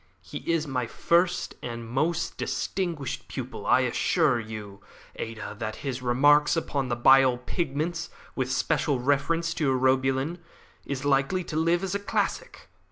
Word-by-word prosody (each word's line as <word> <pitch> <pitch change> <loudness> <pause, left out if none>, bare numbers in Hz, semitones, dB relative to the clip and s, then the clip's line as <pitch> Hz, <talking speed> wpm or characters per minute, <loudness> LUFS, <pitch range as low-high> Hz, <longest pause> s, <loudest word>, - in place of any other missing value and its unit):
He - - -7
is 165 -2 +1
my 125 -4 -2
first 170 +8 +1
and 115 -1 -5
my - - -10
most 165 +1 -1
distinguished 170 -8 -3
pupil. - - -6
I - - +5
assure 120 - +2
you, 105 -3 -8 0.3
Ada, 110 -2 -6
that 110 -1 -3
his 130 -2 -3
'Remarks 145 +6 +4
upon 140 -4 -1
the 120 - 0
Bile 130 +1 +6
Pigments, 165 +5 -3 0.3
with 130 -1 -1
special 135 +1 +1
reference 145 +6 +1
to 150 -5 0
Urobilin,' 130 +5 +1 0.5
is 140 0 -3
likely 145 +7 +2
to 165 - -7
live 170 +3 +2
as 190 -1 -2
a 200 - 0
classic. 200 - -2
135 Hz, 150 wpm, -27 LUFS, 125-165 Hz, 0.5 s, Bile